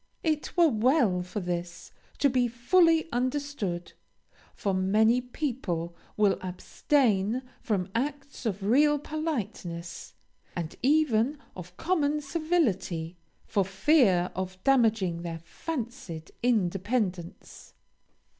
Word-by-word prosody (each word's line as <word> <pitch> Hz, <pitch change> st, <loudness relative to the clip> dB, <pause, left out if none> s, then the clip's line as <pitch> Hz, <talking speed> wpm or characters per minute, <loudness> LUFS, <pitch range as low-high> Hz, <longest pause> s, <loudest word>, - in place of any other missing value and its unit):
It 310 Hz, +1 st, -1 dB
were 340 Hz, -1 st, +7 dB
well 230 Hz, -, +3 dB
for 180 Hz, +3 st, -5 dB
this 175 Hz, -1 st, -5 dB, 0.3 s
to 285 Hz, -, +4 dB
be 250 Hz, -2 st, +2 dB
fully 325 Hz, +8 st, +3 dB
understood, 250 Hz, -8 st, -2 dB, 0.6 s
for 200 Hz, -3 st, -1 dB
many 215 Hz, +6 st, +3 dB
people 235 Hz, -, -3 dB, 0.2 s
will 205 Hz, -2 st, +3 dB
abstain 215 Hz, +4 st, +1 dB, 0.2 s
from 195 Hz, -5 st, -1 dB
acts 275 Hz, 0 st, -3 dB
of 200 Hz, -2 st, -3 dB
real 295 Hz, +8 st, +4 dB
politeness, 220 Hz, -, -5 dB, 0.4 s
and 170 Hz, -2 st, -4 dB
even 275 Hz, -2 st, +3 dB, 0.2 s
of 180 Hz, 0 st, -10 dB
common 300 Hz, -4 st, +1 dB
civility, 245 Hz, -, -1 dB, 0.3 s
for 200 Hz, -, +1 dB
fear 195 Hz, -, +3 dB
of 185 Hz, 0 st, -4 dB
damaging 220 Hz, -10 st, +3 dB
their 170 Hz, -1 st, -4 dB
fancied 230 Hz, -, -6 dB
independence. 195 Hz, -4 st, -1 dB
225 Hz, 100 wpm, -28 LUFS, 180-285 Hz, 0.6 s, were